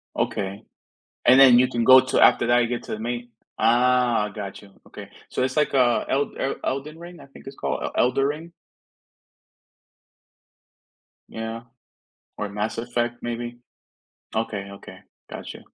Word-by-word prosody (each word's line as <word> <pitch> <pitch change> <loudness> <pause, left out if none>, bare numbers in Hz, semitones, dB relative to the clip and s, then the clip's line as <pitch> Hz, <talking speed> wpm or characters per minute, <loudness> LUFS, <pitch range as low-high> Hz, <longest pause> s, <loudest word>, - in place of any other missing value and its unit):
Okay. 100 +2 -3 0.6
And 130 +2 +7
then 125 -3 +8
you 130 - +4
can 120 -1 -2
go 130 +2 +9
to 130 - 0
after 120 - +5
that 120 0 +4
you 120 - +1
get 120 0 -4
to - - -5
a - - -10
main 120 +1 -4 0.3
Ah, 120 -2 +3
gotcha, 100 -1 -9 0.2
okay. - - -10 0.2
So, - - -2
it's, 130 0 -2
like, 150 -2 +1
uh, 125 -3 +3
El 140 +1 0
El 135 - -1
Elden 140 +4 -4
Ring, 175 +1 -11
I - - -14
think 135 - -16
it's 135 - -9
called - - -3
El - - -3
Elden 135 +2 +1
Ring? 155 +4 -4 2.8
Yeah. 115 +1 -6 0.7
Or 105 - -4
Mass 105 +3 -4
Effect, 120 0 -2
maybe. 120 0 -5 0.8
Okay, 105 -3 -3
okay. 100 - -12 0.3
Gotcha. - - -8
120 Hz, 155 wpm, -23 LUFS, 115-130 Hz, 2.8 s, go